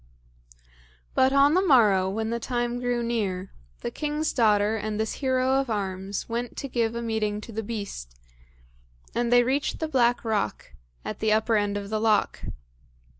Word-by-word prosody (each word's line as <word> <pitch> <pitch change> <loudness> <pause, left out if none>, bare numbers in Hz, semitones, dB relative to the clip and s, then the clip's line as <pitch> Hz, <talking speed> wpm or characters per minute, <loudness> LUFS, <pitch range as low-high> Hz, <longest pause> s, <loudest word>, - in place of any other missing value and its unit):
But 260 0 +4
on 280 +2 +5
the 370 - +4
morrow, 215 - +4
when 220 +3 -2
the 235 - -1
time 240 0 -2
grew 245 -1 -1
near, 200 -6 -2 0.3
the - - -3
king's 300 +1 -2
daughter 210 -2 +3
and 215 0 -3
this 220 0 -1
hero 260 0 +2
of 270 -2 -2
arms 195 -2 -3
went 235 +1 -4
to 275 - -4
give 235 -3 -1
a 235 - -3
meeting 215 -2 -1
to 230 - -10
the 220 0 -3
beast, 200 - -6 0.9
and 240 0 0
they 245 0 +6
reached 270 +4 0
the 320 - -2
black 245 -5 +2
rock, 210 - -2 0.3
at - - -5
the 220 0 +1
upper 220 +1 +2
end 205 -1 +1
of 200 0 -6
the 215 0 -1
loch. 220 -2 +2
225 Hz, 175 wpm, -26 LUFS, 210-245 Hz, 0.9 s, they